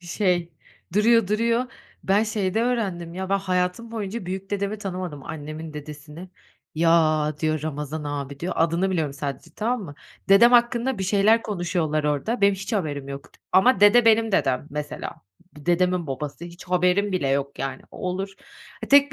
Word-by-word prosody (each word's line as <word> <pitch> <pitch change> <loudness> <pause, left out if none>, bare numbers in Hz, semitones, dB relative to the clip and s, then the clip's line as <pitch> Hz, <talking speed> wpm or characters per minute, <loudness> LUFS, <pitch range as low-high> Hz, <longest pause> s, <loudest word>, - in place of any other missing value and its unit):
şey, 175 -1 -1 0.4
duruyor 225 -1 +4
duruyor. 230 +3 +1 0.4
Ben 200 +2 +3
şeyde 215 -1 -1
öğrendim 195 -9 -2
ya: 190 +1 -4
Ben 195 - +3
hayatım 185 +3 -1
boyunca 215 -3 -5
büyük 190 +2 -5
dedemi 200 +1 -2
tanımadım, 180 -7 -5
annemin 155 0 -7
dedesini. 150 +3 -9 0.5
"Ya" 155 -2 +3
diyor, 155 -1 0
"Ramazan 150 0 -4
abi" 140 -1 -5
diyor. 180 +2 -2
Adını 170 +4 +1
biliyorum 160 -6 -1
sadece, 140 +2 -6
tamam 240 +3 -1
mı? 145 -6 -9 0.3
Dedem 220 +5 +7
hakkında 240 0 +3
bir 190 - -2
şeyler 210 +4 +3
konuşuyorlar 170 -6 -1
orada, 150 - -1
benim 200 0 +5
hiç 195 +5 -7
haberim 145 -9 -2
yok. 140 0 -8 0.2
Ama 195 +2 +5
dede 210 +4 +7
benim 225 -1 +4
dedem, 135 -5 +1
mesela. 150 +1 -5 0.4
D 150 - -14
dedemin 180 0 +2
babası, 145 +4 -5
hiç 175 +1 -11
haberim 180 +3 +2
bile 180 -7 0
yok 140 0 -1
yani, 135 -1 -4
o - - -13
olur. 190 +2 -3 0.5
Ha - - -5
tek 280 0 +6
180 Hz, 165 wpm, -24 LUFS, 155-205 Hz, 0.5 s, Dedem